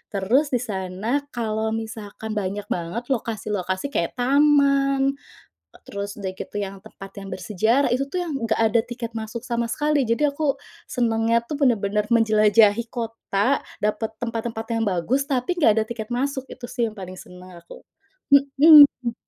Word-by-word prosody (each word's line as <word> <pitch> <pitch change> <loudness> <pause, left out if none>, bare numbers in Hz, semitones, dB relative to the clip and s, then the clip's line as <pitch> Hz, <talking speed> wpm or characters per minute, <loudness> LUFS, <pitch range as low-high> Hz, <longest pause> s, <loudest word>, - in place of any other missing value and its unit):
Terus 235 +10 +2
di 250 -3 -1
sana, 195 +4 -2 0.2
kalau 220 -1 -1
misalkan 220 -1 -7
banyak 205 0 -4
banget 175 +7 -3
lokasi-lokasi 210 -2 -2
kayak 170 -10 -2
taman, 275 +1 +3 0.6
eee, - - -18
terus 200 0 -5
udah 195 -2 -3
gitu 205 - -8
yang 195 -1 -5
tempat 195 0 -12
yang 195 0 -8
bersejarah, 220 +9 +1
itu 275 +2 -1
tuh 365 - -2
yang 320 -5 -4
nggak 230 -4 -1
ada 225 +1 +3
tiket 240 -1 -6
masuk 225 +1 -5
sama 235 -2 -1
sekali. 295 +1 0
Jadi 235 +6 +1
aku 280 -1 -1 0.3
senengnya 230 -1 +1
tuh 285 +4 -5
bener-bener 210 -5 +1
menjelajahi 220 0 +4
kota, 230 +1 -1 0.2
dapet 215 +1 -1
tempat-tempat 230 -1 -3
yang 225 - 0
bagus, 220 +10 0
tapi 265 +3 0
nggak 290 -10 +5
ada - - -3
tiket 220 -2 -6
masuk. 265 +1 -2
Itu 250 - -11
sih 245 -2 0
yang 215 - -12
paling 185 -1 -8
senang 180 -1 -13
aku, 170 - -14 0.5
hmm. 280 -3 +7
230 Hz, 155 wpm, -23 LUFS, 205-265 Hz, 0.6 s, hmm